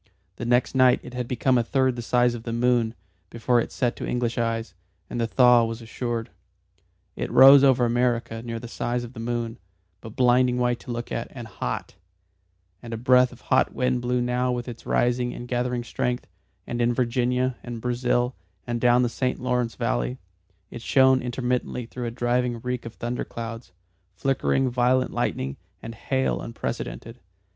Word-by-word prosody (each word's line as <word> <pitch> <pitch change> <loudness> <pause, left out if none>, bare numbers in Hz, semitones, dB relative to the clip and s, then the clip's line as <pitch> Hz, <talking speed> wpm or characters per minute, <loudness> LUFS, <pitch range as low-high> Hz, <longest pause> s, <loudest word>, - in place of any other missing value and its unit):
The 120 - -5
next 120 +1 +2
night 130 -1 +5
it - - -10
had 125 -1 -3
become 125 +1 +2
a - - +1
third 130 +1 +1
the 120 - -4
size 120 +1 +2
of 120 - -6
the 115 - -5
moon 120 -1 +1 0.3
before 120 +1 +1
it - - -5
set 120 -3 -1
to - - -4
English 120 -1 -1
eyes, 115 -3 -2 0.4
and 120 - -2
the 115 - +1
thaw 125 0 +5
was 115 0 -3
assured. 115 0 -4 0.8
It - - -3
rose 135 +1 +8
over 130 -3 +5
America 120 -1 0
near 115 -1 -5
the 120 - -7
size 120 +1 -2
of 120 +1 -9
the 120 - -10
moon, 115 0 -3 0.4
but 110 +1 -11
blinding 125 0 +3
white 120 -1 +1
to 125 - -8
look 120 0 -5
at, 115 - -3
and 120 -3 -9
hot; 95 - -5 0.8
and 115 -1 -6
a - - -5
breath 125 +1 +4
of 125 - -15
hot 130 - +1
wind 125 -1 +1
blew 125 0 0
now 125 +1 0
with 120 0 -3
its 120 -2 -9
rising 120 0 +1
and 120 - -7
gathering 125 0 -1
strength, 125 +1 -2 0.4
and 120 0 -3
in 120 0 +2
Virginia, 125 +1 0
and 120 -1 -6
Brazil, 125 +1 0 0.3
and 120 -1 -3
down 125 0 +4
the - - +2
St. 125 +2 -2
Lawrence 125 -2 -1
valley, - - -1 0.5
it 120 - -8
shone 130 +1 +4
intermittently 125 0 -2
through 120 +1 -5
a - - -1
driving 120 0 0
reek 125 -1 -3
of 115 - -10
thunder 120 +1 -3
clouds, 115 -3 -7 0.4
flickering 135 +3 +1
violet 125 +1 +2
lightning, 65 +1 -2 0.2
and 115 - -8
hail 130 +4 -1
unprecedented. 115 0 -5
120 Hz, 180 wpm, -25 LUFS, 115-125 Hz, 0.8 s, rose